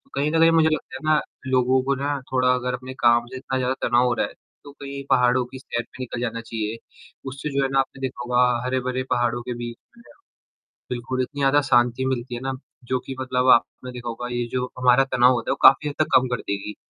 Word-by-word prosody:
कहीं 145 +2 0
न 165 - +2
कहीं 165 0 +6
मुझे 160 -1 +4
लगता 155 - -3
है - - -11
ना 150 - +3 0.3
लोगों 130 0 +3
को 140 +1 +1
ना 140 +1 -2
थोड़ा 125 -1 +3
अगर 125 0 -2
अपने 130 +1 -6
काम 120 0 +4
से - - -6
इतना 130 0 -3
ज़्यादा 130 0 0
तनाव 120 +1 +3
हो 120 - +1
रहा - - 0
है, - - -14 0.3
तो 145 - -11
कहीं 140 -1 -8
पहाड़ों 125 +1 +3
की 130 +2 -11
सैर 120 -2 -4
पे 130 - -13
निकल 120 -1 -5
जाना 115 -1 -3
चाहिए, 110 -1 -4 0.5
उससे 135 +3 -5
जो 140 - +2
है 135 - 0
ना 135 - +2
आपने 135 0 -3
देखा 130 -2 -4
होगा 125 0 +3 0.2
हरे 130 +1 0
भरे 130 +1 -2
पहाड़ों 120 -1 +1
के 125 - -4
बीच 120 0 -6 0.2
में 235 - -17 0.9
बिल्कुल, 125 +1 -2
इतनी 145 +3 -6
ज़्यादा 140 +1 +4
शांति 120 0 +3
मिलती 125 -1 -2
है 120 - -5
ना 135 0 -2 0.4
जो 130 - +1
कि 135 - -6
मतलब 130 0 0
आपने 125 +2 -2
देखा 120 -1 -7
होगा 120 +1 -5
ये 120 0 -1
जो 125 0 -2
हमारा 125 +1 +5
तनाव 125 +1 +5
होता 120 -2 -3
है - - +3
वो - - -1
काफ़ी 150 +3 +7
हद 145 - -5
तक 155 - +2
कम 130 - +3
कर - - -4
देगी। 100 +1 -3
125 Hz, 245 wpm, -23 LUFS, 120-135 Hz, 0.9 s, काफ़ी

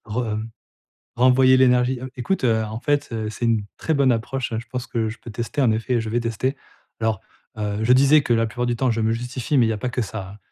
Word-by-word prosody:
Re 105 +3 -4
re 120 - 0
mmh, 110 +1 -5 0.7
renvoyer 130 +1 +5
l'énergie 125 0 +3
heu, 130 - -6
écoute, 135 +9 -2
heu, 110 -3 +2
en 110 +1 -5
fait, 145 +1 0
heu, 110 -2 -3
c'est 115 +2 -4
une 110 -3 +1
très 160 - -1
bonne 140 -3 +3
approche. 120 +2 -2
Je 115 - -6
pense 125 -1 -4
que 115 -3 -1
je 115 - -8
peux 115 - -10
tester, 120 +6 -3
en 120 -4 +4
effet, 115 +2 0
je 110 - -5
vais 120 +2 0
tester. 120 +4 -2 0.4
Alors, 110 -3 -1 0.4
heu, 105 -1 -2
je 125 +3 +5
disais 140 +4 +6
que, 120 - +1
la 115 0 +2
plupart 120 +2 -3
du 120 0 0
temps, 125 +1 +1
je 115 0 -1
me 110 +1 +1
justifie, 125 +4 -2
mais 120 - +5
il 110 - +1
y - - +1
a 105 - -4
pas 125 - -3
que 125 - -2
ça, 95 -3 -6
hein. - - -13
120 Hz, 270 wpm, -22 LUFS, 110-130 Hz, 0.7 s, disais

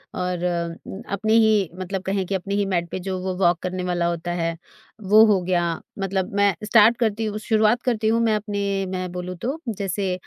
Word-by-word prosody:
और 180 -1 -2
अम, 170 +2 -4
अपनी 215 +2 0
ही 210 -5 +3
मतलब 185 +1 -3
कहें 195 0 -1
कि 195 - -2
अपनी 195 +2 -3
ही 205 0 +1
मैट 170 0 -1
पे - - -3
जो 190 -1 -1
वो 185 -1 -2
वॉक 175 -1 +3
करने 185 0 -3
वाला 175 -1 0
होता 170 0 -3
है, 165 0 -1 0.5
वो 210 +2 +6
हो 205 -4 +3
गया। 175 -1 +1 0.4
मतलब 195 -1 -2
मैं 200 -1 +4
स्टार्ट 225 +2 +5
करती 220 -1 0
हूँ 210 -1 -3
शुरुआत 220 +2 +3
करती 225 -3 0
हूँ 225 +1 +3
मैं 225 -2 +2
अपने 200 -2 -2
मैं 185 -1 -4
बोलूँ 180 0 -5
तो, 260 - -3
जैसे 195 -3 -2
195 Hz, 205 wpm, -23 LUFS, 180-215 Hz, 0.5 s, वो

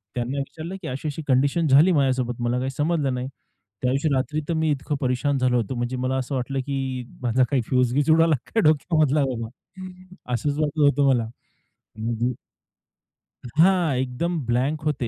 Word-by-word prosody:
त्यांना 125 +3 -2
विचारलं, 160 +6 -5
की 160 - -6
अशी-अशी 145 +3 -4
कंडिशन 140 +5 +2
झाली 150 +7 +6
माझ्यासोबत 130 -5 0
मला 120 +1 0
काही 130 +1 -2
समजलं 145 -1 0
नाही. 125 +1 -3 0.6
त्या 125 - +2
दिवशी 140 +4 +1
रात्री 135 +4 -1
तर 170 - 0
मी 160 -1 +1
इतकं 145 +1 -2
परेशान 135 +1 0
झालो 125 -1 +2
होतो 120 +2 -1
म्हणजे 120 +1 -2
मला 130 +1 -1
असं 130 +1 -3
वाटलं, 135 +2 -2
की 130 -2 -3 0.2
माझा 125 +1 +2
काही 135 -4 +2
फ्युज-बीज 130 +4 +1
उडायला 165 0 +5
काय 225 - 0
डोक्यामधला 155 -1 +3
बाबा 115 -4 -3 0.9
असच 145 +5 -1
वाटत 155 0 -1
होतं 145 0 +3
मला 120 -4 +2 0.7
म्हणजे 115 +2 -1 1.1
हां, 165 +2 +3
एकदम 130 +7 -2
ब्लँक 130 +6 0
होते 140 -5 -1
135 Hz, 165 wpm, -24 LUFS, 125-150 Hz, 1.1 s, झाली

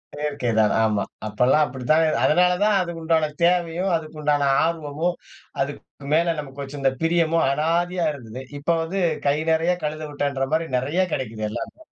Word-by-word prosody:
செயற்கை 145 -4 -2
தான். 105 -2 +3
ஆமா. 105 -2 +1 0.2
அப்பலாம் 125 +8 +3
அப்டித்தான். 145 +5 +1 0.2
அதனால 180 +3 +4
தான் 210 -1 +3
அதுக்கு 170 -2 -5
உண்டான 160 -1 +2
தேவையும், 175 +1 +2
அதுக்கு 155 -1 -5
உண்டான 145 -1 +2 0.2
ஆர்வமும், 165 +1 -1 0.5
அதுக்கு 140 +1 -3 0.3
மேலே 170 +1 +3
நமக்கு 140 0 -7
இந்த 135 -1 +2
பிரியமும் 165 -1 +2
அனாதையா 170 +4 0
இருந்தது. 125 -2 -8 0.2
இப்ப 145 - -5
வந்து 190 +4 -3 0.3
"கை 140 +1 +3
நிறையா 165 +3 +2
கழுத 155 +1 -3
விட்டான்ற" 140 -2 -1
மாரி 165 +1 +1
நிறையா 155 +9 0
கிடைக்குது. 110 -4 -4
எல்லாமே. 110 - -6
155 Hz, 150 wpm, -23 LUFS, 140-170 Hz, 0.5 s, அதனால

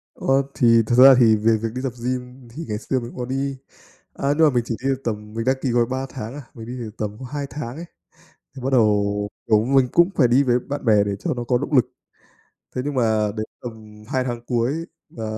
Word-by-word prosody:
Ờ, 135 +1 +2
thì 115 -4 +5
thật 120 - +2
ra 130 +1 +9
thì 115 -3 +6
về 110 +1 +2
việc 115 +1 -3
đi 130 - -3
tập 130 -3 -2
gym 125 0 -4
thì 155 +8 -7
ngày 105 - -1
xưa 130 +3 -1
mình 120 0 -8
có 125 - -3
đi, 135 +2 -2 0.6
à, 140 - -2
nhưng 160 - +6
mà - - +5
mình 120 - +2
chỉ 115 - -2
đi 135 - +1
được 135 0 -1
tầm 105 -2 -4
mình 115 +1 -3
đăng 130 - +3
ký 135 - -1
gói 120 0 +3
3 130 +2 -3
tháng 110 +3 -7
à, 145 - -7
mình 110 -1 -9
đi 125 - -6
được 115 -3 -5
có 110 - -1
tầm 105 +1 -12
2 145 -1 -3
tháng 130 -4 -6
ấy, 165 +3 -7 0.7
thì 130 - -8
bắt 130 - -1
đầu, 105 -3 +2 0.2
kiểu, 110 0 +3
mình 135 -1 +3
cũng 175 +2 +4
phải 130 - +4
đi 125 +4 +4
với 125 -1 +2
bạn 145 +3 -6
bè 105 -3 +5
để 100 - -2
cho 170 - -1
nó 120 - -3
có 125 +1 +1
động 145 - -5
lực. 125 -4 +5 0.9
Thế 125 - -1
nhưng 145 - -2
mà 110 -4 +1
đến 110 - -2 0.2
tầm 110 -3 -10
2 130 0 0
tháng 120 -2 -4
cuối, 130 +7 -1 0.2
và 115 - -8
125 Hz, 255 wpm, -22 LUFS, 110-135 Hz, 0.9 s, ra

